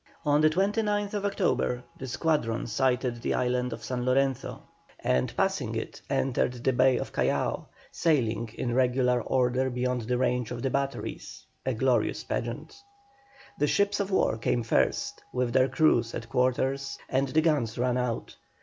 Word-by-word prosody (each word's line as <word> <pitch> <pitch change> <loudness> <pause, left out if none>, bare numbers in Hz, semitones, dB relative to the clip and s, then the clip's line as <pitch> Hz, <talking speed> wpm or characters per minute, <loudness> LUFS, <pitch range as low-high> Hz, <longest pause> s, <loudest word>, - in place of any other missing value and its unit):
On 145 0 +4
the 155 - +6
29th 205 +3 0
October 180 - 0
the 130 - -7
squadron 130 -4 0
sighted 125 0 0
the - - 0
island 125 0 0
of - - -7
San 125 -1 -3
Lorenzo, 135 +1 0 0.4
and, 65 0 +1
passing - - 0
it, - - -5
entered 125 -1 +1
the 125 +2 0
Bay 130 +1 +4
of - - -5
Callao, - - 0 0.2
sailing 115 -8 +1
in 120 -2 -2
regular 125 -1 +2
order 130 +2 +1
beyond 125 0 -1
the 125 +2 -1
range 125 -2 0
of 120 -1 -5
the 135 - 0
batteries, 140 0 -4 0.2
a - - +1
glorious - - +1
pageant. 405 - -5 0.8
The 150 - +3
ships 200 +6 +2
of 200 -1 -1
war 190 - +1
came 120 +1 0
first, 115 - 0
with 125 -2 -1
their 130 0 +4
crews 125 -4 +2
at 110 - -6
quarters 135 +2 0
and 135 +1 +1
the 150 +4 +2
guns 145 -9 +1
run 125 0 +1
out. 125 -2 -3
125 Hz, 160 wpm, -28 LUFS, 125-140 Hz, 0.8 s, the